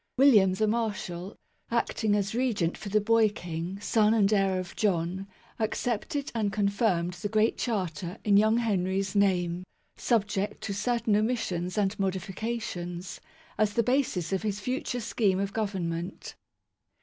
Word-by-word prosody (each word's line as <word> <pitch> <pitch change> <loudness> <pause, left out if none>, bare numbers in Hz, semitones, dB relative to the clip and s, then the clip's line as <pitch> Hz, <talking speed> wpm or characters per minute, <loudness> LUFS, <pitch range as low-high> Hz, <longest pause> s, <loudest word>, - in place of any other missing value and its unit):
William 215 -9 +6
the 215 - +1
Marshal, 205 -5 -2 0.3
acting 225 -2 +1
as 200 0 -1
Regent 225 -9 0
for 205 - -7
the 215 +2 +3
boy 220 +1 +4
King, 175 -1 -5
son 215 +1 +3
and 210 -1 +3
heir 195 -2 +2
of 185 -1 -5
John, 190 -1 0 0.3
ac 220 -1 +1
cepted 280 +6 -2
and 215 -3 0
confirmed 200 -3 +1
the 205 +4 -4
Great 215 +1 +2
Charter 180 - -2
in 205 -2 +4
young 215 +2 +5
Henry's 195 -3 0
name, 180 -3 +2 0.3
subject 205 -3 0
to 200 - -3
certain 220 +1 +1
omissions 210 -5 -1
and 205 +1 0
modi 190 -1 +1
fications, 185 -3 -5 0.4
as 210 -1 +2
the 235 - +3
basis 240 - 0
of 190 - 0
his 210 -2 -2
future 250 +2 -2
scheme 210 -4 +1
of 200 0 -2
Govern 200 -5 -1
ment. 165 +2 -5
205 Hz, 150 wpm, -28 LUFS, 185-220 Hz, 0.4 s, William